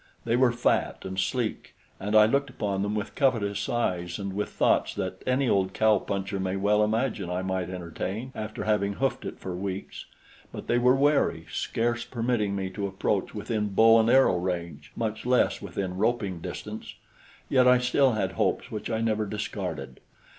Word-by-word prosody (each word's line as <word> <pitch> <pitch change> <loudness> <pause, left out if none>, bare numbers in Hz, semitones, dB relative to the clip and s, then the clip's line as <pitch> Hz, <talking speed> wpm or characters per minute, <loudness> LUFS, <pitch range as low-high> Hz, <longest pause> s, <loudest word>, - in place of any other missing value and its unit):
They 115 0 +2
were 125 -1 +4
fat 120 +1 0
and 95 0 -4
sleek, 120 +1 -2 0.2
and 105 +2 -2
I 105 0 +8
looked 140 +5 +1
upon 100 -2 -2
them 100 +1 -1
with 105 -1 -3
covetous 115 -6 0
eyes 90 -8 -1
and 100 -1 -4
with 105 +1 -2
thoughts - - +1
that - - -4
any 130 +1 +2
old 95 -3 +1
cow 110 -2 +4
puncher 100 0 -3
may 95 0 -1
well 105 +2 +3
imagine 110 -3 -1
I 90 +1 -2
might 95 -1 -2
entertain 95 +7 -5
after 110 0 -5
having 100 -2 +1
hoofed 135 +6 -1
it - - -5
for 90 -1 -5
weeks; 95 +1 -5 0.5
but - - -7
they 120 - +2
were 125 +1 +5
wary, 140 - +2
scarce 120 +1 -1
permitting 115 -4 -1
me 95 -1 -3
to 100 +1 -3
approach 95 +1 -1
within 105 0 -2
bow 115 +1 +7
and 110 +1 +3
arrow 130 -8 +5
range, 85 -4 -4
much 110 -1 -3
less 125 0 +2
within 95 -2 -4
roping 100 -5 0
distance; - - -7 0.5
yet 130 -1 +4
I 125 0 +7
still 125 +1 +3
had 95 -3 -1
hopes 90 - -1
which 105 - -5
I 110 -1 -1
never 110 -2 0
discarded. 105 +1 -5
105 Hz, 180 wpm, -27 LUFS, 95-120 Hz, 0.5 s, I